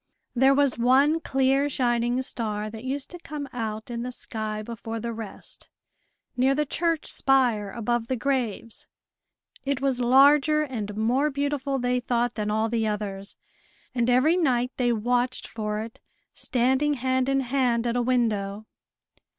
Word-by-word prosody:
There 265 +2 +5
was 280 -4 +2
one 275 +6 +4
clear 270 -1 +1
shining 240 -2 +1
star 215 -4 -4
that 220 +1 -9
used 270 +1 -4
to 350 - -8
come 295 -3 -6
out 220 -1 -4
in 235 0 -3
the 250 +1 -4
sky 215 -3 -4
before 230 0 -6
the 235 +1 -4
rest, 225 -2 -8 0.7
near 265 +2 +3
the 300 +1 +1
church 330 +2 -1
spire, 245 -7 +2
above 235 +2 -2
the 260 - 0
graves. 240 -4 -2 0.8
It 280 -1 -1
was 270 -2 0
larger 285 +4 +5
and 215 -7 -5
more 250 +7 +2
beautiful, 280 -1 -1
they 250 0 0
thought, 240 -1 0
than 210 -1 -2
all 220 +1 +1
the 225 -1 0
others, 200 -2 -4 0.6
and 240 -1 +1
every 270 +8 +4
night 250 -7 +1
they 245 -2 +2
watched 245 +3 0
for 210 -1 -3
it, 225 +1 -9 0.3
standing 265 +4 +1
hand 260 0 0
in 270 0 +2
hand 245 -2 +1
at 235 0 0
a 245 - +2
window. 220 -4 0
245 Hz, 155 wpm, -26 LUFS, 225-270 Hz, 0.8 s, There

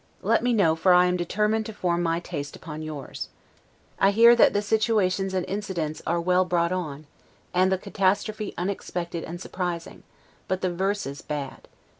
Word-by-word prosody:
Let - - +3
me 245 - +1
know, 190 -9 +3
for 180 +3 +4
I 180 0 +6
am 180 0 +1
determined 210 +5 0
to 220 - -7
form 175 -4 0
my 165 -1 +1
taste 145 -5 -6
upon 155 -2 -8
yours. 155 -4 -6 0.7
I 195 - +5
hear 230 +4 +7
that 235 - +6
the 205 - 0
situations 205 -3 +1
and 185 - 0
incidents 190 -6 -3
are 170 +1 +1
well 180 +2 +3
brought 175 -1 +1
on, 155 -5 -4 0.5
and 185 +1 +3
the 190 - +2
catastrophe 205 +3 -1
unexpected 175 -2 -3
and 175 +2 -7
surprising, 175 -2 -4 0.5
but 185 0 -1
the 185 -1 0
verses 190 -6 -2
bad. 140 -3 -6
180 Hz, 170 wpm, -25 LUFS, 170-200 Hz, 0.7 s, hear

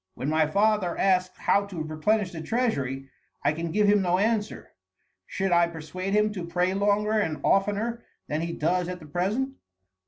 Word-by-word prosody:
When 135 - -3
my 155 0 +2
father 200 0 +1
asks 185 -1 +1
how 200 0 +2
to 175 -6 -5
replenish 180 +6 0
the 165 -3 -6
treasury, 140 - -1 0.4
I 145 +1 +3
can 165 +1 -4
give 210 +4 +2
him 205 0 +4
no 180 -1 +2
answer. 215 +1 -1 0.6
Should 195 -1 -2
I 170 0 +5
persuade 170 +4 -4
him 210 0 +3
to 185 -4 -5
pray 180 +2 0
longer 205 +2 +1
and 160 -7 -1
oftener 210 +4 +1 0.3
than 150 +2 -2
he 170 0 -3
does 175 +3 0
at 180 0 -5
the 155 - -12
present?" 205 - -2
185 Hz, 180 wpm, -26 LUFS, 165-210 Hz, 0.6 s, I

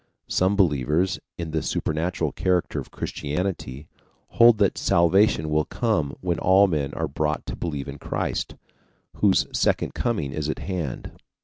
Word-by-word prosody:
Some 95 +2 +2
believers 85 - +1 0.2
in 85 -2 -5
the 80 0 -1
supernatural 80 +4 -1
character 90 -2 0
of - - -8
Christianity 75 -3 -4 0.4
hold 120 -1 +6
that 100 -2 +2
salvation 85 -1 +3
will 75 0 +2
come 85 - -1
when 90 -2 -1
all 95 +2 +5
men 75 -7 -1
are 80 - -1
brought 75 +2 -2
to - - -5
believe 75 -5 -4
in 70 0 -7
Christ, - - -3 0.6
whose 100 -2 +3
second - - +1
coming 90 - -1
is 75 +1 -3
at - - -2
hand. 85 -9 -4
85 Hz, 145 wpm, -24 LUFS, 75-95 Hz, 0.6 s, hold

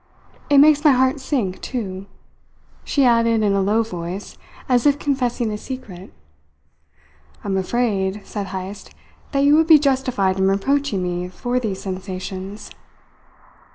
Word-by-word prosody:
It 285 - +5
makes 295 +1 +6
my 300 -3 +6
heart 260 +2 +2
sink, 245 -9 -2
too," 195 -6 -5 0.8
she 280 -2 +1
added 230 -2 +3
in 205 -1 +2
a 200 - +2
low 210 +4 +2
voice, 180 -1 -6 0.3
as 250 +1 +3
if 285 0 +3
confessing 250 -6 -1
a 210 - -4
secret. 205 -9 -9 1.3
"I'm 195 -1 -2
afraid," 195 -1 -1
said 205 -2 -5
Heyst, 190 +1 -7 0.4
"that 275 -1 +1
you 290 +1 +5
would 320 0 +3
be 320 -2 +9
justified 255 -9 0
in 190 - +3
reproaching 200 +1 0
me 180 0 -3
for 245 +6 -2
these 205 -6 -4
sensations. 190 +1 -6
215 Hz, 140 wpm, -21 LUFS, 190-265 Hz, 1.3 s, be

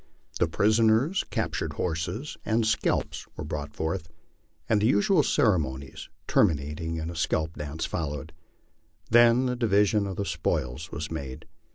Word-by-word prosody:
The 85 - +3
prisoners, 110 - +3
captured - - -2
horses, 90 - -3
and 110 0 +1
scalps 110 - 0
were - - -4
brought 75 -1 -5
forth, 80 0 -3 0.6
and 105 -2 +2
the 110 - +4
usual 140 - +4
ceremonies, 75 - 0 0.2
terminating 80 -2 +1
in 80 +1 -3
a - - -9
scalp 80 0 -1
dance, 75 +2 -4
followed. 75 -1 -4 0.8
Then 120 +2 +6
the 125 -1 0
division 105 -3 +2
of 95 - -4
the 100 - -2
spoils 75 -3 -2
was 75 +1 -5
made. 70 -5 -6
85 Hz, 140 wpm, -27 LUFS, 75-110 Hz, 0.8 s, Then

